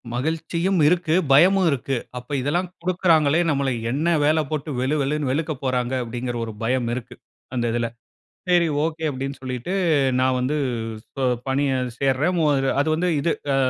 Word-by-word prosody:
மகிழ்ச்சியும் 165 +7 -1
இருக்கு, 170 -1 +2 0.2
பயமும் 180 +6 +6
இருக்கு. 135 -1 -1 0.2
"அப்போ 125 +3 -7
இதெல்லாம் 175 +7 -1
குடுக்குறாங்களே, 170 -4 +3
நம்மள 140 -2 +1 0.2
என்ன 150 +6 -1 0.2
வேல 155 +2 +3
போட்டு 155 0 -3
வெளு 135 +4 +1
வெளுன்னு 145 0 -1
வெளுக்க 155 +3 -1
போறாங்க!" 125 -1 0
அப்டீங்குற 120 +1 -4
ஒரு 110 - -7
பயம் 125 +1 0
இருக்கு, 120 -1 -6 0.4
அந்த 120 -1 0
இதுல. 120 0 0 0.6
"சரி, 175 -1 +4 0.2
ஓகே." 160 0 -3
அப்டின்னு 135 +1 -5
சொல்லிட்டு 125 +5 -4 0.5
நான் 130 0 +2
வந்து 130 +4 0 0.6
ஸோ 135 - -2 0.3
பணிய 140 +1 +1 0.3
சேருறேன். 140 +6 +1
மு 165 - +2 0.4
அது 145 - +1
வந்து 175 +3 0
இது 165 +3 +1 0.2
அ - - +3
145 Hz, 155 wpm, -23 LUFS, 130-165 Hz, 0.6 s, பயமும்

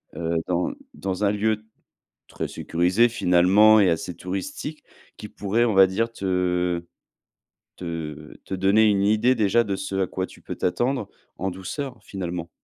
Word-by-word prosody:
heu, 85 +1 -1
dans 90 -1 0 0.2
dans 95 - -3
un 100 - +3
lieu 110 +1 -1 0.6
très - - -4
sécurisé, 90 +8 +2
finalement, 100 +2 +5
et 95 - +4
assez 85 +1 -2
touristique, 100 - -5 0.3
qui 105 - -8
pourrait, 105 +3 0
on 115 - +1
va 95 -1 +7
dire, 115 +5 -1
te 90 -4 -1 0.9
te 75 -3 -6
te - - -5
donner 100 +4 +4
une 100 -1 +2
idée 110 +5 +3
déjà 110 +1 +3
de 100 -3 -2
ce 95 0 -5
à 95 - +1
quoi 95 0 -3
tu - - -16
peux - - -6
t'attendre 120 +4 -1 0.3
en 95 +2 -2
douceur, 125 +8 -6
finalement. 90 -4 -5
95 Hz, 155 wpm, -24 LUFS, 90-110 Hz, 0.9 s, va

